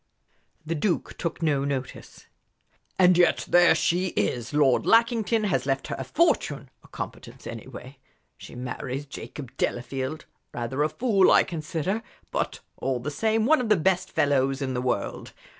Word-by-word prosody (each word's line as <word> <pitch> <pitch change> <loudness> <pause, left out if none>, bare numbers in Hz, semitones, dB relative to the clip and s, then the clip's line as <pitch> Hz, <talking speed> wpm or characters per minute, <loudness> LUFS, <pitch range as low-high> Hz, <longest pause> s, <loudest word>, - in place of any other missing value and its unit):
The 165 - -2
Duke 170 +3 -1
took 170 0 -3
no 145 -3 +2
notice. 135 -2 -5 0.7
"And 180 -1 +5
yet 175 - +3
there 175 -1 +6
she 180 +2 +1
is! 110 +3 -1
Lord 145 -3 +3
Lackington 230 -1 +3
has 190 -8 0
left 135 0 -1
her - - -2
a - - -2
fortune 145 - 0
a - - -17
competence, - - -8
anyway. 130 +2 -9 0.4
She - - -12
marries 125 +2 -5
Jacob 135 -2 -9
Delafield 130 +4 -3 0.3
rather 120 +4 -2
a 150 - +2
fool, 205 0 +3
I - - +6
consider, 170 +5 -3 0.3
but - - -2 0.2
all 130 -2 -1
the 140 +5 -4
same 220 +6 +1
one 310 +2 +4
of 235 - -3
the 210 - +5
best 185 +2 +1
fellows 135 -1 +1
in 135 -2 -2
the 125 - -1
world. 125 0 -3
150 Hz, 160 wpm, -26 LUFS, 135-185 Hz, 0.7 s, there